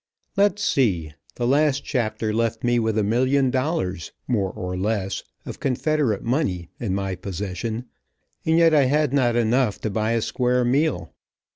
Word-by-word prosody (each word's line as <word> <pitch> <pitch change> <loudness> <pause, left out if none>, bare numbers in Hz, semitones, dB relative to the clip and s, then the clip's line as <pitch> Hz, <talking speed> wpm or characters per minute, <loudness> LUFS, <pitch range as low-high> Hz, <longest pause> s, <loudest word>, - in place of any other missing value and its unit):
Let's 205 0 +2
see, 90 - +1 0.2
the 120 - -2
last 140 +2 +2
chapter 110 -4 -1
left 115 0 -1
me 120 0 +2
with 110 -1 0
a 110 - +2
million 130 +5 +2
dollars, 130 - -2 0.2
more 105 -6 +1
or 90 0 -5
less, 95 0 -1 0.2
of - - -7
confederate 135 -4 0
money 115 - -1
in 105 -8 -1
my 95 -1 -2
possession, 100 +5 -4 0.6
and 160 0 +2
yet 165 -1 +5
I 145 -3 +5
had 145 +1 +1
not 125 -4 +2
enough 120 -1 +2
to 110 - -2
buy 110 +2 0
a 115 - +1
square 125 0 +1
meal. 130 - 0
120 Hz, 160 wpm, -23 LUFS, 100-135 Hz, 0.6 s, yet